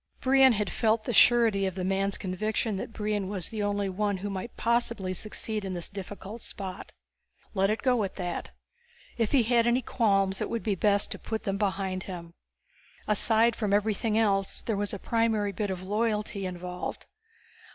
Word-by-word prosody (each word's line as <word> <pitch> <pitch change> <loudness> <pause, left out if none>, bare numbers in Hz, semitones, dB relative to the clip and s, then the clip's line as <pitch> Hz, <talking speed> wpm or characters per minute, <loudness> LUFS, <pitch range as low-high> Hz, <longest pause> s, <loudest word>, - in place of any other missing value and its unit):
Brion 265 -1 +6
had 210 -4 -1
felt 220 -1 +2
the 245 - -2
surety 225 -4 +5
of 185 - -4
the 185 - -3
man's 195 +1 0
conviction 215 +3 -1
that 195 - -5
Brion 210 -3 -2
was 190 -4 -3
the 220 -2 -4
only 205 -1 0
one 200 +1 -1
who 200 +2 -4
might 195 +4 -6
possibly 235 -5 0
succeed 215 +2 -3
in 190 -1 -3
this 175 - -4
difficult 200 +3 -8
spot. 190 -3 -7 0.6
Let 195 -1 +2
it 215 - -1
go 250 -4 +3
at 195 - -4
that. 175 -2 -4 0.7
If 225 - +1
he 270 -4 +5
had 235 0 +3
any 245 +2 +2
qualms 195 -5 +1
it - - -1
would 230 - -2
be 215 - +1
best 200 +1 +2
to - - -4
put 220 -1 -4
them 195 0 -2
behind 190 -2 -1
him. 170 -3 -7 0.7
Aside 225 +2 +3
from 210 -3 -1
everything 215 +1 +1
else, 195 -3 +1
there 225 - -1
was 205 0 -1
a 200 - -3
primary 220 -1 +1
bit 205 +2 -2
of 185 -1 -4
loyalty 210 -1 -1
involved. 180 0 -5
205 Hz, 185 wpm, -28 LUFS, 195-225 Hz, 0.7 s, Brion